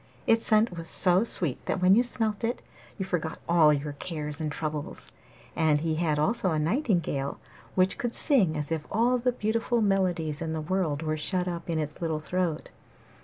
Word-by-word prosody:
Its 225 0 +3
scent 215 -3 +3
was 165 -1 -6
so 180 +3 +4
sweet 170 - -1
that - - 0
when 185 +1 +5
you 225 - +6
smelt 225 -3 0
it 235 +2 -2 0.3
you 190 - -3
forgot 170 -4 -2
all 165 -3 +5
your 145 0 -2
cares 150 -1 -2
and 155 -1 -2
troubles. 150 -1 -5 0.5
And 155 -3 +2
he 160 0 0
had 155 -2 0
also 190 +5 +1
a 160 - 0
nightingale 170 - 0 0.4
which 185 0 +2
could 240 -1 -2
sing 200 - +3
as 150 +1 -4
if 160 -2 -2
all 240 +4 +2
the 250 +1 +1
beautiful 230 +1 0
melodies 180 -7 0
in 160 -1 -3
the 160 - -2
world 160 -3 -1
were 155 0 -1
shut 180 +3 -2
up 170 -1 -5
in 165 - 0
its 150 0 -4
little 160 -2 -1
throat. 170 0 -2
170 Hz, 190 wpm, -27 LUFS, 155-205 Hz, 0.5 s, you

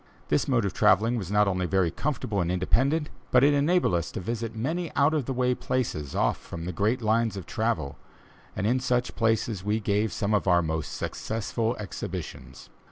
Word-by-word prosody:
This - - +2
mode 120 -5 +2
of 95 - -2
travelling 110 +6 +3
was 95 -7 -4
not 105 0 +3
only 90 -2 0
very 90 -1 +2
comfortable 110 - -2
and 85 0 -1
independent, 135 - +1 0.2
but 125 0 +5
it 145 +1 +5
enabled 150 - +2
us 85 -1 -1
to - - -3
visit 115 +3 -4
many 160 +9 -2
out 140 +3 +4
of 150 -5 0
the 135 - -3
way 125 -1 +1
places, 110 - -2
off - - +2
from 85 -1 -8
the 90 - -3
great 110 +8 0
lines 110 -1 +1
of 95 - -6
travel, 110 -12 -2 0.6
and 95 - -2
in 125 +4 +2
such 125 -1 0
places 110 -3 0
we 105 +2 0
gave 105 0 0
some 100 +4 -1
of 105 - +1
our 90 -1 +4
most 80 -1 -3
successful 115 +1 -2
exhibitions. 95 -4 -7
110 Hz, 195 wpm, -27 LUFS, 95-125 Hz, 0.6 s, but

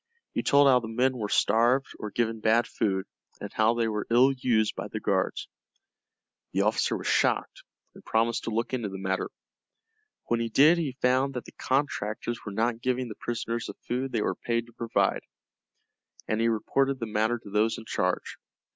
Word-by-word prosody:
He - - 0
told 140 0 +5
how 130 -2 +6
the 115 - -7
men 125 +3 +1
were 105 -4 -3
starved 120 +7 +3
or 105 - -4
given 115 +1 -1
bad 110 +2 +3
food, 95 -6 -1 0.3
and - - -7
how 110 +2 +3
they 115 -1 +1
were 105 -1 -3
ill 125 +4 +5
used 120 -5 +1
by - - -5
the - - -5
guards. - - -1 1.1
The - - +2
officer - - +1
was - - -8
shocked - - +1 0.3
and - - -15
promised 115 +1 0
to - - -2
look 115 +3 -2
into 120 -5 -1
the 95 - -6
matter. 95 0 -2 1.0
When 120 - 0
he 115 0 -1
did 155 +9 +5
he 140 -6 -3
found 130 +2 +2
that 125 - -4
the - - -12
contractors 120 -4 -2
were 105 - -6
not 115 +3 -1
giving 125 0 -1
the 105 - -7
prisoners 115 0 -3
the - - -7
food 130 +2 -2
they 110 -4 0
were - - 0
paid 115 0 -2
to 120 - -19
provide, 115 0 0 1.1
and 110 +1 0
he 115 - +3
reported 135 +5 +1
the 115 - -2
matter 110 +2 0
to 105 -3 -13
those 110 +2 +2
in 115 - -10
charge. - - -2
115 Hz, 190 wpm, -27 LUFS, 110-125 Hz, 1.1 s, how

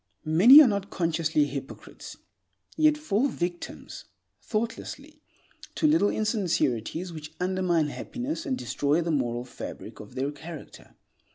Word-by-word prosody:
Many 215 - +9
are - - +4
not 200 -2 -2
consciously 160 -3 +1
hypocrites, 140 -1 -8 0.6
yet 310 -1 +4
fall 270 -4 0
victims, 175 -8 -5 0.4
thoughtlessly, 280 +7 -5 0.5
to - - 0
little 300 -9 +4
insincerities 175 - -1
which 155 0 -9
undermine 180 -4 +1
happiness 265 - -5
and 260 -2 -1
destroy 150 - 0
the 165 0 -2
moral 120 -4 -1
fabric 125 - -9
of 105 - -12
their 135 +2 -1
character. 160 +1 -11
175 Hz, 120 wpm, -27 LUFS, 150-235 Hz, 0.6 s, Many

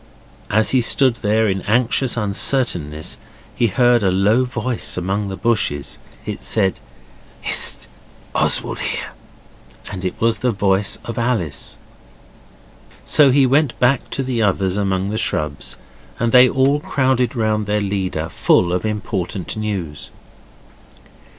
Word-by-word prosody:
As 110 +1 +2
he 130 - +3
stood 125 +1 +2
there 110 +1 +1
in 95 -1 -1
anxious 120 +3 +1
uncertainness 100 - -1 0.3
he 120 - +1
heard 120 +3 +3
a 95 - +2
low 105 +7 +2
voice 125 -3 -3
among 100 +3 -2
the 95 - -5
bushes. 95 - -1 0.3
It - - -5
said, 95 -4 +1 0.6
'Hist! - - +1 0.5
Oswald - - 0
here!' - - -4 0.8
and 95 -1 -6
it 90 - -4
was 115 -2 +1
the 125 +2 +1
voice 100 -1 +1
of 115 0 -4
Alice. 115 - -2 1.3
So 145 -2 +5
he 135 +1 +4
went 135 +1 +1
back 125 +1 +2
to 135 - -2
the 125 -3 -1
others 95 -2 +1
among 95 -1 -1
the 110 - -1
shrubs 75 -9 -2 0.4
and 115 0 +1
they 125 +1 +7
all 135 +3 +2
crowded 130 -4 0
round 110 -2 0
their 105 0 +1
leader 95 -5 -2
full 85 +1 +2
of 90 +4 -1
importable 100 -3 -3
news. 95 -9 -4
110 Hz, 135 wpm, -19 LUFS, 95-125 Hz, 1.3 s, they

